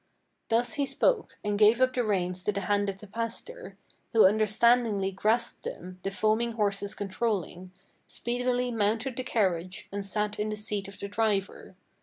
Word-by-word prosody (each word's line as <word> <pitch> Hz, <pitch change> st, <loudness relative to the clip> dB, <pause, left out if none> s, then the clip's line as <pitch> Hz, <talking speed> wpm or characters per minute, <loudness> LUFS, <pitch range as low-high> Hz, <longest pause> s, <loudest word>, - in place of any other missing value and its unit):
Thus 235 Hz, +2 st, +2 dB
he 285 Hz, -3 st, 0 dB
spoke, -, -, +1 dB
and 205 Hz, 0 st, -1 dB
gave 220 Hz, +2 st, +6 dB
up 255 Hz, 0 st, +3 dB
the 250 Hz, -, +1 dB
reins 180 Hz, -4 st, -1 dB
to -, -, +2 dB
the 200 Hz, -1 st, -3 dB
hand 205 Hz, +1 st, +1 dB
of 195 Hz, 0 st, -6 dB
the -, -, -9 dB
pastor, 230 Hz, -, -6 dB, 0.4 s
Who 225 Hz, -3 st, +7 dB
understandingly 215 Hz, 0 st, +3 dB
grasped 215 Hz, +5 st, +1 dB
them, 185 Hz, +1 st, -7 dB
the 195 Hz, -, -2 dB
foaming 220 Hz, +4 st, +1 dB
horses 205 Hz, -1 st, -1 dB
controlling, 190 Hz, -3 st, -3 dB, 0.4 s
Speedily 245 Hz, +1 st, -1 dB
mounted 225 Hz, +3 st, 0 dB
the 255 Hz, -, -2 dB
carriage, 185 Hz, -7 st, -1 dB
and 200 Hz, 0 st, -3 dB
sat 210 Hz, +1 st, -2 dB
in 210 Hz, +1 st, -1 dB
the 215 Hz, -, -2 dB
seat 210 Hz, -2 st, -4 dB
of 195 Hz, -, -11 dB
the 200 Hz, -, -4 dB
driver. 205 Hz, -3 st, -1 dB
210 Hz, 170 wpm, -28 LUFS, 195-235 Hz, 0.4 s, Who